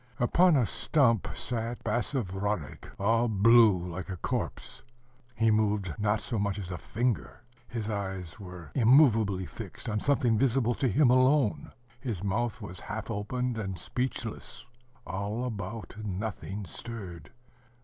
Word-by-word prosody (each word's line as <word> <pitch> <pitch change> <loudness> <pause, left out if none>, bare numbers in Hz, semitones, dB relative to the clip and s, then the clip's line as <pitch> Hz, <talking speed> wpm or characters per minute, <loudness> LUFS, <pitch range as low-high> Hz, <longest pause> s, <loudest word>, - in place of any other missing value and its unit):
Upon 170 +8 +5
a 130 -4 +4
stump 115 - +2
sat 115 0 -3
Basavriuk, 105 - -2
all 115 +4 +3
blue 110 -1 +6
like 90 +3 -6
a 95 - -4
corpse. - - -3 0.5
He 115 -1 +3
moved 105 -4 +1
not 105 +1 +1
so 115 -4 -3
much 100 -1 0
as 95 -3 -5
a 90 - -3
finger. 115 -7 -2 0.2
His 115 -3 -4
eyes 95 -4 -4
were 90 -4 -9
immovably 115 -7 +5
fixed 80 - -8
on 105 -1 0
something 120 -4 +2
visible 125 -2 +2
to 130 - 0
him 125 +3 +4
alone: 130 -2 +3 0.3
his 115 -8 -4
mouth 110 +2 -1
was 90 +2 -7
half 105 +2 -5
open 125 +4 -2
and 95 -3 -3
speechless. 120 -1 -4 0.4
All 105 +6 -3
about, 110 -2 -5
nothing 100 0 -4
stirred. 90 -2 -7
110 Hz, 135 wpm, -29 LUFS, 100-120 Hz, 0.5 s, blue